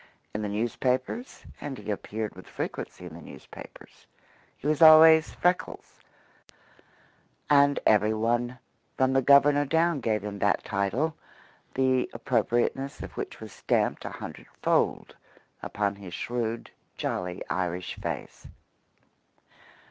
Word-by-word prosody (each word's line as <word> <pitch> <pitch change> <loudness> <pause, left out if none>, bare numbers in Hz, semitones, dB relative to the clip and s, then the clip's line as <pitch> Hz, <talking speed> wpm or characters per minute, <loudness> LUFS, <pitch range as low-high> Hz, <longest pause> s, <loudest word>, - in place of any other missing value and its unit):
In 105 - -3
the 105 - -2
newspapers 125 - -2 0.2
and 140 -3 -5
he 105 0 -5
appeared 105 +1 -4
with 95 0 -13
frequency 90 - -6
in 85 - -9
the 85 - -10
newspapers - - -13 0.5
he - - -15
was 150 0 +1
always 160 0 +8
"Freckles," 180 +1 -1 1.5
and 140 0 +5
every 105 0 +4
one 120 +3 0 0.4
from 130 0 +2
the 135 - +3
Governor 140 +2 +5
down 160 +2 +1
gave 110 -4 -1
him 100 -1 -6
that 100 - +1
title, 105 +11 -1 0.6
the 130 -1 +2
appropriateness 120 +3 -1
of - - -8
which - - -6
was - - -10
stamped - - 0
a - - -4
hundred - - -9 0.2
fold - - +1 0.5
upon 100 -1 -2
his 95 -3 -8
shrewd, 115 -1 -3 0.3
jolly 90 0 -3
Irish 90 -1 -2
face. - - -6
120 Hz, 125 wpm, -27 LUFS, 105-140 Hz, 1.5 s, always